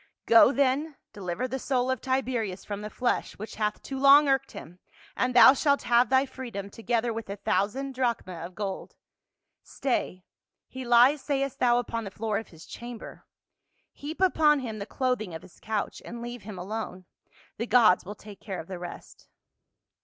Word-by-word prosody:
" - - -63
Go 230 +2 +7
then, 280 +2 +1 0.2
deliver 195 +5 -3
the 265 +2 -4
soul 255 -1 0
of 260 - -2
Tiberius 250 -7 -2
from 205 -1 -5
the 210 - -6
flesh 245 +3 -2
which 215 +2 -8
hath 210 -1 -2
too 270 -1 -5
long 280 +2 +7
irked 270 -1 +1
him, 175 +3 -11 0.4
and 250 -1 0
thou 250 - +9
shalt 285 0 +1
have 240 -1 +3
thy 265 +1 +4
freedom, 235 -7 -7
together 230 +1 -1
with 225 -2 -6
a 200 - -3
thousand 210 +8 -1
drachmae 240 -7 -1
of 180 +1 -9
gold. 195 -2 -5 0.7
Stay 185 -8 -3 0.2
— - - -62
he 260 0 -5
lies, 245 +4 +5
sayest 275 -1 -2
thou, 240 -1 +4
upon 230 -1 -2
the 200 - -6
floor 215 +1 -2
of 225 - -9
his 160 -2 -15
chamber; 240 -1 -10 0.7
heap 300 +3 -7
upon 305 -6 +4
him 220 -4 -5
the 200 - -6
clothing 240 -10 -2
of 160 - -8
his - - -17
couch, 215 -1 -3
and 235 - -8
leave 240 -1 -7
him 200 -1 -9
alone; 185 -1 -5 0.5
the 230 - -3
gods 220 -6 +5
will 205 +3 -8
take 210 -2 -13
care 190 -3 -6
of - - -7
the 185 -2 -6
rest." 175 -1 -10
235 Hz, 185 wpm, -27 LUFS, 205-260 Hz, 0.7 s, thou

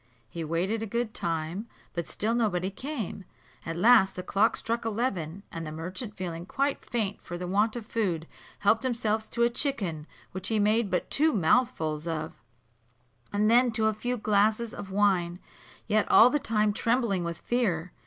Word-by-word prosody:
He 165 - -4
waited 180 +8 -1
a 225 - -3
good 235 +1 -2
time, 165 +6 -3 0.3
but 170 -1 -3
still 220 +3 -1
nobody 200 -6 0
came: 240 - -5 0.4
at 165 0 -3
last 215 0 +5
the 180 - -5
clock 200 +4 +2
struck 230 +1 -2
eleven, 200 -6 -2
and 165 - -5
the 155 - -6
merchant, 185 +7 -5
being 175 -1 -5
quite 275 +4 -1
faint 210 -4 -2
for 175 - -6
the 180 - -5
want 205 +5 +1
of 235 -3 -5
food, 185 -9 -1 0.4
helped 220 +4 +3
himself 220 -3 -1
to 235 - 0
a 235 - +4
chicken, 195 - -1 0.2
which 190 +1 -3
he 220 - +1
made 215 +1 +2
but 180 - -1
two 310 +2 +3
mouthfuls 160 -5 +1
of, 155 -6 -4 0.9
and 205 +1 +2
then 240 +2 +5
to 220 -1 +1
a 220 - +3
few 245 +4 -2
glasses 215 +2 +1
of 205 -4 -7
wine, 190 -3 +2 0.5
yet 215 -1 +1
all 245 +3 +8
the 295 - +2
time 215 -4 +1
trembling 230 -5 +1
with 170 -1 -4
fear. 185 -9 -1
205 Hz, 175 wpm, -28 LUFS, 175-230 Hz, 0.9 s, all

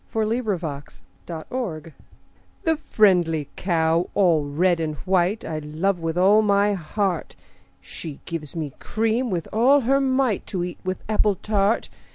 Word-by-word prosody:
XXIII 220 +2 +1
The 170 - -3 0.4
Cow 170 +1 -4 0.8
The 325 -3 +2
friendly 180 - +2
cow 165 -1 +1
all 170 -7 +3
red 170 +5 +1
and 155 -2 -2
white, 185 +5 0
I 155 -1 -3
love 160 +6 -1
with 165 0 -3
all 200 +4 +5
my 205 0 +3
heart: 190 0 -2 0.4
She 150 -4 -9
gives 160 -4 -6
me 155 -5 -4
cream 225 +3 0
with 175 -5 -2
all 260 +6 +5
her 270 +3 +2
might, 260 -5 +1
To 180 -3 -2
eat 175 0 -6
with 185 0 -4
apple 210 -1 +2
tart. 205 +2 0
185 Hz, 145 wpm, -23 LUFS, 165-215 Hz, 0.8 s, all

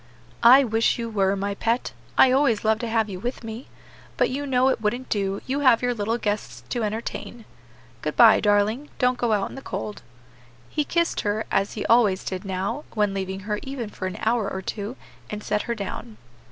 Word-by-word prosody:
"I 255 +4 +8
wish 225 -2 +1
you 230 -1 -4
were, 195 -2 +2
my 200 +1 -2
pet; 230 +4 -1 0.2
I 260 - +7
always 260 -6 +2
love 220 0 +3
to 235 - -3
have 225 -1 +1
you 190 -3 -6
with 245 +4 -4
me; 225 +3 -7 0.5
but - - +2
you 285 +2 -3
know 260 0 +3
it 260 - -1
wouldn't 240 +4 -2
do; 195 -1 -1
you 270 +2 -1
have 255 -4 +4
your 245 0 +2
little 225 +1 -1
guests 205 - -3
to 240 - -2
entertain. 220 +1 -5 0.6
Good 150 - -3
by, 230 -2 +7
darling. 210 +7 +1
Don't 250 -1 +1
go 240 -2 +1
out 205 -2 +1
in - - -11
the 270 - -8
cold." 210 -5 -5 0.7
He 300 - 0
kissed 340 +3 0
her, 210 +1 -1
as 195 +1 +1
he 215 - -4
always 215 -5 +4
did 185 +1 -5
now, 190 +9 -3
when 210 -2 +1
leaving 190 0 -4
her 210 +1 -2
even 265 -5 -5
for 185 - -4
an 185 - -6
hour 225 -2 +1
or 190 - -4
two, 210 +5 -4 0.3
and 210 0 -5
set 210 0 0
her 235 - 0
down. 190 - -6
220 Hz, 205 wpm, -24 LUFS, 200-245 Hz, 0.7 s, I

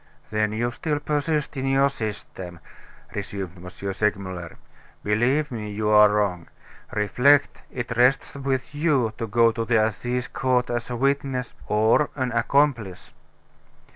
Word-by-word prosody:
"Then 105 0 +1
you 120 +3 -1
still 150 +4 -2
persist 150 0 -1
in 135 0 -2
your 135 +1 +4
system," 105 -8 -6 0.5
resumed 95 -3 -5
M. 90 +1 -9 0.2
Segmuller. 95 -4 -2 0.5
"Believe 130 +9 +1
me, 110 -3 -5
you 105 +1 -2
are 105 0 +7
wrong. 100 -5 0 0.4
Reflect 125 +8 +3
it 120 -2 -4
rests 125 +3 +3
with 135 -1 -3
you 145 -7 +1
to 115 - -2
go 115 +1 +4
to 115 0 -3
the 115 0 +2
Assize 125 +4 -2
Court 125 -3 0
as 120 0 -3
a 125 - -3
witness, 135 -1 -1
or 110 +7 +3
an 130 -3 -1
accomplice." 115 -5 0
120 Hz, 140 wpm, -24 LUFS, 105-135 Hz, 0.5 s, are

